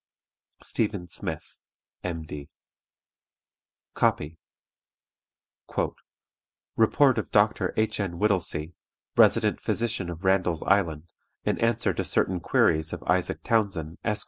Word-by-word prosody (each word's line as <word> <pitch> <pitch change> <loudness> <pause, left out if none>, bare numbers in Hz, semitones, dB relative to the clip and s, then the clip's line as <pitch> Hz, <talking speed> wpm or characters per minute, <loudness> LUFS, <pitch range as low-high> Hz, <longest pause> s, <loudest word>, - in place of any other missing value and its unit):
STEPHEN 100 -5 -2
SMITH, - - -6 0.4
M.D. 80 -5 -5 1.4
(Copy.) 80 +2 0 2.4
"Report 125 +2 +4
of 90 -9 -5
Doctor - - +2
H. 110 0 0
N. 95 -4 -2
WHITTELSEY, 90 -5 0 0.4
Resident - - +4
Physician 110 -6 -1
of 85 +1 -7
Randall's 95 -4 +2
Island, 85 -6 +1 0.4
in - - 0
answer 115 0 +1
to - - -2
certain 95 -1 +2
queries 80 -1 +2
of - - -5
ISAAC 90 0 0
TOWNSEND, 95 -8 0
_Esq. 105 -2 0
95 Hz, 100 wpm, -26 LUFS, 80-105 Hz, 2.4 s, Report